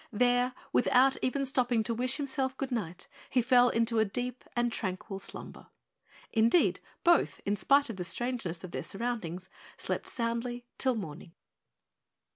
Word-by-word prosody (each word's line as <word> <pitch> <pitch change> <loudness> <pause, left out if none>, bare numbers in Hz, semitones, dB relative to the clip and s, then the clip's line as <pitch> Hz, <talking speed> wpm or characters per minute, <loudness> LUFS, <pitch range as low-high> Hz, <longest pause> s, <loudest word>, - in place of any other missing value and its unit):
There, 245 +2 +2 0.2
without 260 +2 +5
even 275 +2 0
stopping 245 -3 +1
to 230 - 0
wish 250 +3 +1
himself 265 -2 -1
goodnight, 225 -10 -3 0.2
he 255 - +2
fell 245 0 +5
into 230 0 +1
a - - +5
deep 245 +4 -4
and 240 0 +1
tranquil 195 -1 -4
slumber. - - -10 0.7
Indeed 230 +9 +4 0.2
both, 345 0 +3
in 205 - +1
spite 280 +6 +3
of 205 - -9
the 180 - -3
strangeness 190 -2 -2
of 185 - -7
their 130 - -3
surroundings, 190 - -4 0.3
slept - - -2
soundly 240 +1 -2
till 260 -2 +2
morning. 165 -4 -7
240 Hz, 145 wpm, -30 LUFS, 200-255 Hz, 0.7 s, without